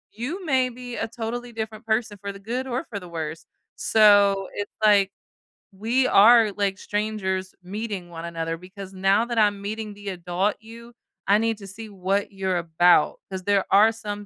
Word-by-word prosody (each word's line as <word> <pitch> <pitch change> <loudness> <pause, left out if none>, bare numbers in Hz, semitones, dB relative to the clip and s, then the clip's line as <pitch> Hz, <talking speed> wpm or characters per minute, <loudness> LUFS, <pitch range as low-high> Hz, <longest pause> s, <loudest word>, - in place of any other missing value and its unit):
you 300 - -5
may 260 -4 +2
be 245 0 -8
a - - -2
totally 240 +1 -5
different 220 -1 -6
person 220 -1 0
for 200 0 -4
the 195 - -11
good 245 +6 -4
or 255 +5 -3
for 205 - -5
the 180 - -11
worst. 160 -1 -6 0.3
So, 205 -3 +4
it's 205 0 -5
like, 200 -2 +5 0.6
we 235 +7 +1
are, 225 +1 +6
like, 195 -1 -1
strangers 195 -3 -3
meeting 200 -1 -5
one 165 -1 -8
another 165 -1 -3
because 190 +2 -11
now 195 +4 +2
that 240 -1 -4
I'm 205 -2 +3
meeting 215 +1 -5
the 205 0 -12
adult 180 +2 -1
you, 230 +2 -13 0.3
I 200 +1 +5
need 225 0 0
to 200 - -10
see 215 +3 -9
what 195 +1 -1
you're 190 -2 -2
about, 170 -1 +3
‘cause 190 -1 -6
there 200 0 +2
are 210 +3 +6
some 205 -2 -6
205 Hz, 180 wpm, -24 LUFS, 190-225 Hz, 0.6 s, are